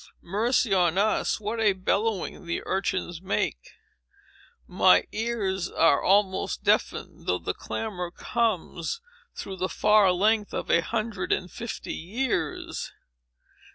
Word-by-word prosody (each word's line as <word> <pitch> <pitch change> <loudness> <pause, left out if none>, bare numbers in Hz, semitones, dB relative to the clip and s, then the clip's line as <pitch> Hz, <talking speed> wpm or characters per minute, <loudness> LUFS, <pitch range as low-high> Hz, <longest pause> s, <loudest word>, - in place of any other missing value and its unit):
Mercy 220 +4 +1
on 180 -2 +3
us, 215 +2 +1
what 215 +2 -3
a 210 -3 +4
bellowing 190 -1 -1
the 170 - -2
urchins 185 -3 -2
make! 185 - -2 0.9
My 90 +8 +4
ears 205 -5 -2
are 165 -4 +3
almost 195 0 +2
deafened, - - 0
though - - +2
the - - -3
clamor 185 -6 -4
comes 200 - -2 0.4
through 190 -1 -6
the 185 +1 -1
far 210 -3 +4
length 210 +3 +1
of - - -2
a 170 - +5
hundred 215 0 -3
and 180 -1 0
fifty 235 -1 -6
years. 230 +9 -3
195 Hz, 120 wpm, -26 LUFS, 180-220 Hz, 0.9 s, a